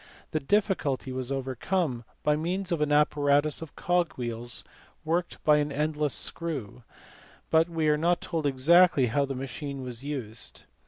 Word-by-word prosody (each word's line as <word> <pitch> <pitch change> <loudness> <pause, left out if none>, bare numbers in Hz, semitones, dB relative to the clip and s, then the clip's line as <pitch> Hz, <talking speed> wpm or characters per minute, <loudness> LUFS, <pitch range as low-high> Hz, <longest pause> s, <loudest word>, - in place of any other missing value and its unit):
The 155 - 0
difficulty 150 -6 0
was 130 0 -3
overcome 135 0 -1 0.2
by 150 - +3
means 180 +4 -2
of 165 -3 0
an 150 -1 +1
apparatus 145 0 +3
of 160 -3 -9
cogwheels 120 -10 -1 0.4
worked 170 +2 -1
by 150 -1 +5
an 145 0 0
endless 150 0 0
screw, 130 -8 -2 0.7
but 160 +1 +4
we 165 -2 0
are 150 0 +3
not 170 +2 +2
told 160 -4 -2
exactly 145 +2 +5
how 140 +4 +1
the 135 -1 -4
machine 135 +1 -5
was 125 0 -5
used. 125 -7 -5
150 Hz, 150 wpm, -28 LUFS, 130-165 Hz, 0.7 s, by